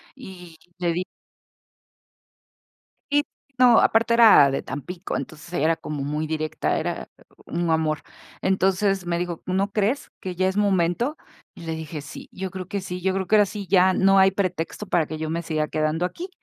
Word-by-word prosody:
y 180 Hz, -10 st, -12 dB, 0.2 s
le 175 Hz, -1 st, 0 dB
di 180 Hz, +2 st, -2 dB, 2.1 s
y, 290 Hz, 0 st, +3 dB, 0.3 s
no, 250 Hz, -2 st, +6 dB
aparte 230 Hz, +1 st, +3 dB
era 220 Hz, -12 st, +7 dB
de 135 Hz, -, -1 dB
Tampico, 170 Hz, +7 st, -5 dB
entonces 155 Hz, +1 st, -8 dB
era 165 Hz, 0 st, +2 dB
como 150 Hz, -3 st, -5 dB
muy 150 Hz, +2 st, -2 dB
directa, 155 Hz, 0 st, -1 dB
era -, -, -3 dB, 0.4 s
un 170 Hz, 0 st, -2 dB
amor, 155 Hz, -1 st, +1 dB, 0.4 s
entonces 190 Hz, 0 st, +1 dB
me 170 Hz, -1 st, -1 dB
dijo: 175 Hz, -1 st, -4 dB
"¿No 195 Hz, +2 st, 0 dB
crees 215 Hz, +7 st, 0 dB
que 185 Hz, -1 st, -5 dB
ya 185 Hz, +1 st, +1 dB
es 190 Hz, +1 st, -2 dB
momento?". 200 Hz, -, +1 dB, 0.4 s
Y 170 Hz, -, -11 dB
le 165 Hz, -, -3 dB
dije: 160 Hz, -1 st, -6 dB
"Sí, 145 Hz, -, -10 dB
yo 190 Hz, 0 st, -5 dB
creo 185 Hz, -1 st, -6 dB
que 200 Hz, +1 st, -3 dB
sí, 180 Hz, -1 st, -6 dB
yo 190 Hz, +1 st, +1 dB
creo 190 Hz, 0 st, -1 dB
que 215 Hz, -, +4 dB
ahora 210 Hz, -1 st, +6 dB
sí, 205 Hz, 0 st, -6 dB
ya 185 Hz, 0 st, +4 dB
no 195 Hz, +1 st, +4 dB
hay 190 Hz, 0 st, +6 dB
pretexto 185 Hz, 0 st, -3 dB
para 175 Hz, -5 st, +1 dB
que 155 Hz, -, -5 dB
yo 155 Hz, 0 st, -4 dB
me 165 Hz, +1 st, -2 dB
siga 155 Hz, -2 st, -1 dB
quedando 155 Hz, +2 st, 0 dB
aquí". 345 Hz, -, -6 dB
180 Hz, 185 wpm, -24 LUFS, 160-195 Hz, 2.1 s, era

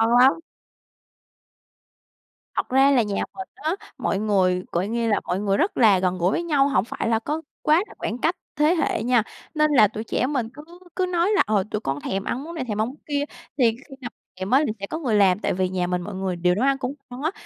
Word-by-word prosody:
Ngon 230 Hz, +2 st, +4 dB
lắm. 265 Hz, +6 st, +5 dB, 2.2 s
Thật -, -, -1 dB
ra 270 Hz, +2 st, +5 dB
là 250 Hz, -4 st, +4 dB
nhà 205 Hz, -2 st, -2 dB
mình 255 Hz, 0 st, -7 dB
á, 315 Hz, +4 st, -2 dB, 0.2 s
mọi 195 Hz, -, -1 dB
người, 185 Hz, -4 st, +2 dB
gọi 175 Hz, +3 st, 0 dB
nghe 230 Hz, +1 st, -1 dB
là, 210 Hz, -, +2 dB
mọi 180 Hz, -, 0 dB
người 200 Hz, -1 st, +1 dB
rất 375 Hz, -, 0 dB
là 210 Hz, -6 st, +5 dB
gần 185 Hz, 0 st, 0 dB
gũi 180 Hz, +1 st, +2 dB
với 340 Hz, -, -1 dB
nhau, 290 Hz, -5 st, +3 dB
hổng 210 Hz, -7 st, +1 dB
phải 235 Hz, -, -3 dB
là 225 Hz, -1 st, +2 dB
có 300 Hz, +7 st, -3 dB, 0.2 s
quá 315 Hz, +5 st, +4 dB
là -, -, -14 dB
khoảng 225 Hz, -, -3 dB
cách 330 Hz, +7 st, +1 dB, 0.2 s
thế 305 Hz, +4 st, +3 dB
hệ 315 Hz, -8 st, 0 dB
nha, 240 Hz, -2 st, +3 dB, 0.3 s
nên 305 Hz, 0 st, +3 dB
là 235 Hz, -7 st, +6 dB
tụi 215 Hz, +2 st, -6 dB
trẻ 250 Hz, +2 st, -1 dB
mình 255 Hz, -6 st, -1 dB
cứ 295 Hz, +2 st, -11 dB, 0.3 s
cứ 370 Hz, 0 st, +1 dB
nói 355 Hz, +1 st, +1 dB
là, -, -, +5 dB
ờ, 210 Hz, -3 st, +2 dB
tụi 210 Hz, -, -1 dB
con 135 Hz, -4 st, -2 dB
thèm 195 Hz, 0 st, -2 dB
ăn 255 Hz, +5 st, -3 dB
món 335 Hz, +2 st, -8 dB
này, 290 Hz, -, -2 dB
thèm 210 Hz, -1 st, -1 dB
ăn 220 Hz, -, +1 dB
món 260 Hz, -, -8 dB
kia, 285 Hz, -1 st, -1 dB, 0.3 s
thì 260 Hz, -, +3 dB, 0.2 s
khi 275 Hz, -, -11 dB
nào 245 Hz, -, -5 dB, 0.2 s
thèm 190 Hz, +1 st, -5 dB
á 275 Hz, +4 st, +5 dB
thì -, -, 0 dB
sẽ 200 Hz, -, -5 dB
có 315 Hz, -, -4 dB
người 245 Hz, -8 st, 0 dB
làm, 195 Hz, -2 st, +4 dB
tại -, -, -1 dB
vì 185 Hz, 0 st, 0 dB
nhà 180 Hz, -1 st, -1 dB
mình 180 Hz, 0 st, -1 dB
mọi 195 Hz, +2 st, -6 dB
người 190 Hz, -1 st, -2 dB
đều 180 Hz, +1 st, +2 dB
nấu 230 Hz, -, 0 dB
ăn 275 Hz, 0 st, +3 dB
cũng 260 Hz, 0 st, -3 dB, 0.2 s
ngon 250 Hz, +1 st, -8 dB
á, 315 Hz, +3 st, 0 dB
230 Hz, 255 wpm, -23 LUFS, 195-285 Hz, 2.2 s, là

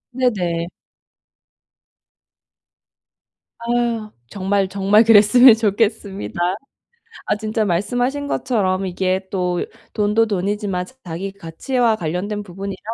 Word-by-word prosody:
네네. 180 Hz, -10 st, 0 dB, 2.9 s
아. 235 Hz, -2 st, -1 dB, 0.2 s
정말 195 Hz, 0 st, 0 dB
정말 200 Hz, +3 st, +3 dB
그랬으면 225 Hz, +3 st, +7 dB
좋겠습니다. 205 Hz, -3 st, -1 dB, 0.9 s
아, -, -, +1 dB
진짜 215 Hz, +1 st, -1 dB
말씀하신 245 Hz, +10 st, -1 dB
것처럼 195 Hz, -9 st, 0 dB
이게 185 Hz, +1 st, -1 dB
또 180 Hz, -2 st, -1 dB, 0.3 s
돈도 210 Hz, +1 st, +2 dB
돈이지만 200 Hz, -2 st, -2 dB, 0.2 s
자기 180 Hz, +3 st, -5 dB
가치와 215 Hz, +6 st, -1 dB
관련된 185 Hz, +5 st, -3 dB
부분이라 195 Hz, 0 st, -7 dB
205 Hz, 220 characters per minute, -20 LUFS, 185-225 Hz, 2.9 s, 그랬으면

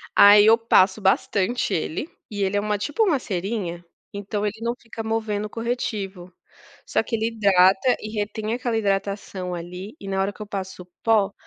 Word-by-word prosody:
Aí 205 Hz, +1 st, +8 dB
eu 225 Hz, +1 st, +7 dB
passo 215 Hz, -3 st, +3 dB
bastante 200 Hz, +3 st, +1 dB
ele, 160 Hz, -, -2 dB, 0.2 s
e 205 Hz, -2 st, -2 dB
ele 195 Hz, +1 st, 0 dB
é -, -, +3 dB
uma, 210 Hz, 0 st, -1 dB
tipo, 295 Hz, -, 0 dB
uma 340 Hz, -10 st, +2 dB
cerinha, 185 Hz, -4 st, -4 dB, 0.3 s
então 205 Hz, +1 st, -3 dB
ele 210 Hz, +1 st, -3 dB
não 235 Hz, +1 st, -1 dB
fica 225 Hz, -1 st, -8 dB
movendo 220 Hz, -2 st, -2 dB
o -, -, -6 dB
corretivo. 205 Hz, -6 st, -4 dB, 0.5 s
Só -, -, +1 dB
que 230 Hz, -, -2 dB
ele 220 Hz, 0 st, 0 dB
hidrata 200 Hz, +1 st, +4 dB
e 215 Hz, -, -6 dB
retém 215 Hz, +1 st, -3 dB
aquela 240 Hz, -2 st, -1 dB
hidratação 195 Hz, -3 st, -2 dB
ali, 180 Hz, +5 st, -8 dB
e 195 Hz, -, -9 dB
na 195 Hz, 0 st, 0 dB
hora 195 Hz, +1 st, -1 dB
que -, -, -13 dB
eu 210 Hz, -, -6 dB
passo 190 Hz, -3 st, -6 dB
o -, -, -22 dB, 0.2 s
pó, 210 Hz, -3 st, +3 dB
205 Hz, 190 wpm, -23 LUFS, 190-225 Hz, 0.5 s, Aí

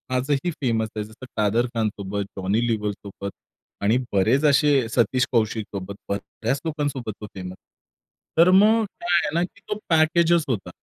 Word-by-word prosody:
आजही 140 Hz, +6 st, 0 dB
फेमस 115 Hz, -4 st, +1 dB
आहे. 105 Hz, -, -2 dB
जसं 110 Hz, +4 st, -12 dB
कादर 110 Hz, +3 st, +2 dB
खानसोबत, 100 Hz, -2 st, -2 dB
जॉनी 100 Hz, +5 st, 0 dB
लिवरसोबत 105 Hz, -3 st, -3 dB, 0.5 s
आणि 105 Hz, +4 st, +3 dB, 0.2 s
बरेच 110 Hz, +9 st, +3 dB
असे 145 Hz, -3 st, +4 dB
सतीश 125 Hz, +2 st, +2 dB
कौशिकसोबत. 105 Hz, -4 st, -1 dB
बऱ्याच 115 Hz, +6 st, -3 dB
लोकांसोबत 145 Hz, -7 st, -2 dB
तो -, -, -5 dB
फेमस 90 Hz, -1 st, -6 dB
आहे. 95 Hz, -, -15 dB, 0.7 s
तर 170 Hz, +2 st, +7 dB
मग 215 Hz, +4 st, +5 dB
काय 175 Hz, -3 st, -2 dB
आहे -, -, -1 dB
ना 170 Hz, -, +2 dB
की 190 Hz, +3 st, -8 dB
तो 210 Hz, -, -1 dB
पॅकेजच 165 Hz, +1 st, +4 dB
होता. 105 Hz, -9 st, -2 dB
120 Hz, 150 wpm, -24 LUFS, 105-150 Hz, 0.7 s, तर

